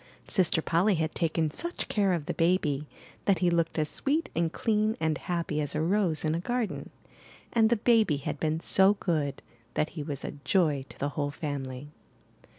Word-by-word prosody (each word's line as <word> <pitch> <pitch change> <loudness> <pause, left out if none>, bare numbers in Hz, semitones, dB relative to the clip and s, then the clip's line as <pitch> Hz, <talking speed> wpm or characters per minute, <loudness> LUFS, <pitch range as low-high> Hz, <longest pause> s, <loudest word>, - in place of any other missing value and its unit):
Sister 170 -4 +2
Polly 185 +5 +3
had 160 -1 -1
taken 160 -2 0
such 345 - -3
care 200 -3 +2
of 165 -4 -2
the - - -2
baby 160 -4 +1 0.4
that 195 -2 +4
he 180 -1 +2
looked 170 -1 0
as 155 -1 +1
sweet 295 - -1
and 165 0 +1
clean 215 +1 +1
and 160 -1 +1
happy 170 -4 -2
as 145 - -2
a 155 - +1
rose 175 -4 +1
in 155 - +1
a 165 - 0
garden; 240 +4 -2 0.6
and 225 -2 +4
the 235 - +4
baby 220 -8 +3
had 140 +1 -4
been 155 0 0
so 195 +3 +4
good 155 -8 -1 0.3
that 155 - +1
he 160 - -6
was 145 -2 -4
a - - -3
joy 155 -8 +2
to - - -13
the 140 - -1
whole 145 -1 -2
family. 145 -2 -5
165 Hz, 190 wpm, -28 LUFS, 150-195 Hz, 0.6 s, that